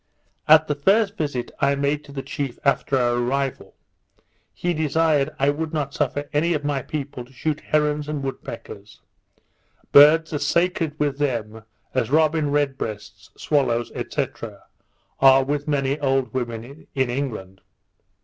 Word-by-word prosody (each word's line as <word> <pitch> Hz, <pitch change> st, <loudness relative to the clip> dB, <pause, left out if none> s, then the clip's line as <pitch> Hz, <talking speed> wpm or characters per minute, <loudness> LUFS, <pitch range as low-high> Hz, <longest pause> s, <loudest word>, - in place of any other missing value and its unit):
At 155 Hz, 0 st, +7 dB
the 150 Hz, -, -1 dB
first 200 Hz, +8 st, +2 dB
visit 140 Hz, -6 st, -3 dB
I 140 Hz, 0 st, +2 dB
made 140 Hz, +1 st, -1 dB
the 140 Hz, -2 st, -7 dB
chief 135 Hz, -2 st, -4 dB
after 140 Hz, 0 st, +2 dB
our 120 Hz, -1 st, +1 dB
arrival, 135 Hz, +2 st, -2 dB, 0.8 s
he 175 Hz, 0 st, -2 dB
desired 155 Hz, -2 st, +1 dB
I 140 Hz, +1 st, +3 dB
would 160 Hz, +2 st, -4 dB
not 140 Hz, -2 st, -2 dB
suffer 145 Hz, -1 st, -2 dB
any 165 Hz, +4 st, +2 dB
of 150 Hz, -, -3 dB
my 145 Hz, -2 st, 0 dB
people 140 Hz, -3 st, -5 dB
to 125 Hz, -, -19 dB
shoot 150 Hz, +3 st, -2 dB
herons 150 Hz, -1 st, 0 dB
and 150 Hz, -2 st, -3 dB
wood 135 Hz, 0 st, -5 dB
peckers; 105 Hz, -3 st, -10 dB, 0.9 s
birds 155 Hz, +3 st, +7 dB
as 145 Hz, -, -1 dB
sacred 170 Hz, -3 st, 0 dB
with 145 Hz, -1 st, 0 dB
them 115 Hz, -6 st, -2 dB, 0.3 s
as 125 Hz, -4 st, 0 dB
robin 155 Hz, 0 st, +2 dB
red 145 Hz, -2 st, 0 dB
breasts, 105 Hz, -2 st, -7 dB
swallows, 120 Hz, -5 st, 0 dB, 0.2 s
&c. -, -, 0 dB, 0.9 s
are 135 Hz, 0 st, +7 dB
with 145 Hz, +2 st, -2 dB
many 140 Hz, -1 st, 0 dB
old 135 Hz, -2 st, 0 dB
women 120 Hz, +3 st, -5 dB
in 130 Hz, -2 st, +1 dB
England. 110 Hz, -8 st, -5 dB
140 Hz, 150 wpm, -23 LUFS, 130-150 Hz, 0.9 s, At